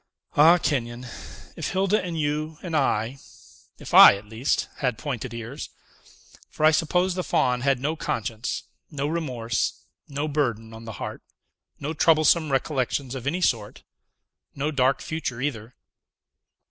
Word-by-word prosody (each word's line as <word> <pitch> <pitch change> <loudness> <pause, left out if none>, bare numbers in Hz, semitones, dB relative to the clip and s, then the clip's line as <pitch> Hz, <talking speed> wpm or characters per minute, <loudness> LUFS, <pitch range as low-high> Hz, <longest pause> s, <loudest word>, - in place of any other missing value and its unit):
Ah! 165 +4 +7
Kenyon, 125 -6 -2 0.5
if 160 +1 -4
Hilda 195 +2 +2
and 170 -3 -4
you 150 +1 -2
and 170 -3 -3
I 130 -2 0 0.6
if - - -10
I, - - +10
at 100 +2 -10
least 115 +6 -1
had 125 -5 -1
pointed 130 -2 -4
ears! 115 +5 -7 0.8
For 155 - 0
I 155 - +7
suppose 180 +4 +1
the 180 0 -2
Faun 125 -6 +1
had 135 -1 +2
no 150 +5 -1
conscience, 115 -5 -3 0.3
no 145 -3 -3
remorse, 130 -7 -2 0.2
no 145 +2 -3
burden 120 -7 -1
on 110 +1 -10
the 110 - -6
heart, - - -6 0.6
no 150 +3 -3
troublesome 155 0 +4
recollections 135 -1 -1
of 130 -1 -5
any 175 +6 -1
sort; 110 -10 -1 0.7
no 145 +3 -1
dark 135 -2 +2
future 155 -7 -4
either." 125 -4 -4
140 Hz, 145 wpm, -25 LUFS, 120-155 Hz, 0.8 s, I